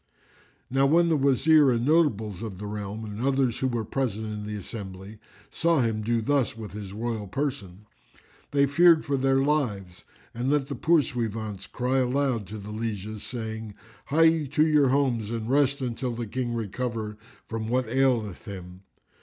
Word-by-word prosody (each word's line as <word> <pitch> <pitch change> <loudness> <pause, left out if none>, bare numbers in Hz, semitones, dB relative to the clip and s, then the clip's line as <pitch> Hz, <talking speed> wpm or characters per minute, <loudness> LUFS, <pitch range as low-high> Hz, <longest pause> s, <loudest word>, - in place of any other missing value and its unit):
Now 135 +1 +3
when 170 +3 +4
the 160 - +3
Wazir 140 +1 +5
and 120 -1 +1
notables 110 - +2
of 110 -5 -6
the 105 - -7
realm 105 +1 -5
and 105 +1 -6
others 130 -2 +1
who 130 - +1
were 120 -3 -2
present 110 -4 -2
in 105 -1 -5
the 105 - -4
assembly 100 0 -8 0.3
saw 165 -4 +2
him 110 -2 -1
do 115 +1 0
thus 135 -3 +1
with 110 -3 -7
his 105 -2 -7
royal 110 0 -3
person, 105 -5 -4 0.6
they 140 -1 +3
feared 165 +3 +5
for 145 - 0
their 135 0 +2
lives 105 -12 -1 0.3
and 120 +3 -2
let 145 -1 +1
the 140 - -3
poursuivants 115 - 0
cry 130 +2 0
aloud 130 -4 0
to 110 - -7
the 105 +1 -8
lieges, 110 -1 -4
saying, 110 -3 -6 0.3
"Hie 155 +4 +3
ye 160 -2 +4
to 150 +3 +3
your 150 -4 +4
homes 125 -6 +1
and 115 -1 -3
rest 140 +1 +2
till 125 -3 -2
the 120 0 -3
King 120 +2 -3
recover 110 -1 -4 0.3
from 110 -1 -4
what 125 0 +1
aileth 120 -5 +1
him." 90 -2 -9
120 Hz, 170 wpm, -26 LUFS, 105-140 Hz, 0.6 s, Wazir